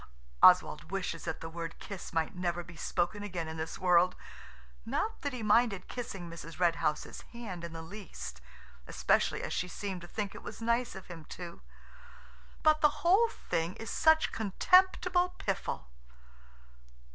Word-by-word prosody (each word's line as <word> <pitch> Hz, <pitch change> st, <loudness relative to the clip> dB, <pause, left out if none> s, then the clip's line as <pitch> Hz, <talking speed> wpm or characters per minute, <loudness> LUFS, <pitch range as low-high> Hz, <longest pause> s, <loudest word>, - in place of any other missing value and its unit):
Oswald -, -, +6 dB
wishes 180 Hz, -3 st, -3 dB
that 160 Hz, -, -3 dB
the 165 Hz, -, -5 dB
word 165 Hz, 0 st, -6 dB
"kiss" 195 Hz, -3 st, -7 dB
might 160 Hz, -1 st, 0 dB
never 175 Hz, -1 st, -1 dB
be 170 Hz, 0 st, -12 dB
spoken 175 Hz, +5 st, -1 dB
again 180 Hz, -5 st, -4 dB
in 160 Hz, 0 st, -6 dB
this 160 Hz, +1 st, -4 dB
world. 180 Hz, 0 st, +4 dB, 0.7 s
Not 445 Hz, -, -2 dB
that 285 Hz, -3 st, -1 dB
he 250 Hz, -4 st, -5 dB
minded 210 Hz, -2 st, +3 dB
kissing 195 Hz, -8 st, -5 dB
Mrs. 165 Hz, 0 st, -9 dB
Red 170 Hz, -2 st, +3 dB
House's 150 Hz, -2 st, -2 dB
hand 205 Hz, -8 st, -6 dB
in 170 Hz, -, -5 dB
the 165 Hz, 0 st, -7 dB
least, 115 Hz, -, -8 dB, 0.5 s
especially -, -, +1 dB
as -, -, -3 dB
she 180 Hz, -, -1 dB
seemed 190 Hz, 0 st, -5 dB
to 175 Hz, -, -9 dB
think 205 Hz, +1 st, -3 dB
it -, -, -9 dB
was -, -, -8 dB
nice 235 Hz, +1 st, 0 dB
of 190 Hz, -, -8 dB
him 165 Hz, -3 st, -10 dB
to–but 185 Hz, -, -4 dB
the 300 Hz, 0 st, +3 dB
whole 405 Hz, +7 st, +6 dB
thing 170 Hz, -, -2 dB
is 225 Hz, -, -6 dB
such 315 Hz, 0 st, +4 dB
contemptible 360 Hz, -, +3 dB
piffle. 195 Hz, -, -2 dB
185 Hz, 160 wpm, -32 LUFS, 170-235 Hz, 0.7 s, Oswald